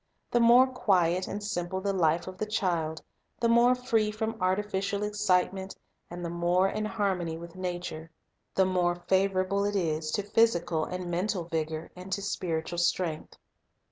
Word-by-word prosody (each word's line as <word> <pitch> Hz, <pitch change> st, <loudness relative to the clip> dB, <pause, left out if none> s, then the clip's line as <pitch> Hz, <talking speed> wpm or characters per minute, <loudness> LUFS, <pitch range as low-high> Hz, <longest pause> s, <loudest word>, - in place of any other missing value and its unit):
The 240 Hz, -, +3 dB
more 240 Hz, +2 st, +7 dB
quiet 185 Hz, -8 st, +1 dB
and 205 Hz, +1 st, -5 dB
simple 185 Hz, -2 st, -2 dB
the 200 Hz, +1 st, -1 dB
life 170 Hz, -2 st, +2 dB
of 185 Hz, 0 st, -9 dB
the 215 Hz, -, -2 dB
child, 170 Hz, -7 st, -1 dB, 0.2 s
— -, -, -44 dB
the 235 Hz, -, +2 dB
more 235 Hz, +2 st, +5 dB
free 230 Hz, -4 st, +1 dB
from 220 Hz, +1 st, -3 dB
artificial 195 Hz, +1 st, 0 dB
excitement 195 Hz, -2 st, 0 dB, 0.3 s
and 175 Hz, 0 st, -6 dB
the -, -, -3 dB
more 175 Hz, +2 st, +2 dB
in 215 Hz, +2 st, -2 dB
harmony 190 Hz, -7 st, -1 dB
with 170 Hz, +1 st, -10 dB
nature, 175 Hz, -3 st, -5 dB, 0.2 s
— -, -, -49 dB
the 190 Hz, -, +4 dB
more 180 Hz, -2 st, +1 dB
favorable 195 Hz, +1 st, +2 dB
it 205 Hz, 0 st, -1 dB
is 160 Hz, -4 st, -1 dB
to 205 Hz, -, 0 dB
ohysical 175 Hz, -7 st, +1 dB
and 180 Hz, -1 st, -4 dB
mental 180 Hz, +1 st, -1 dB
vigor 160 Hz, -1 st, -3 dB
and 180 Hz, +1 st, -10 dB
to 200 Hz, -, -1 dB
spiritual 175 Hz, -3 st, -2 dB
strength. 175 Hz, -2 st, -1 dB
185 Hz, 170 wpm, -29 LUFS, 175-205 Hz, 0.3 s, more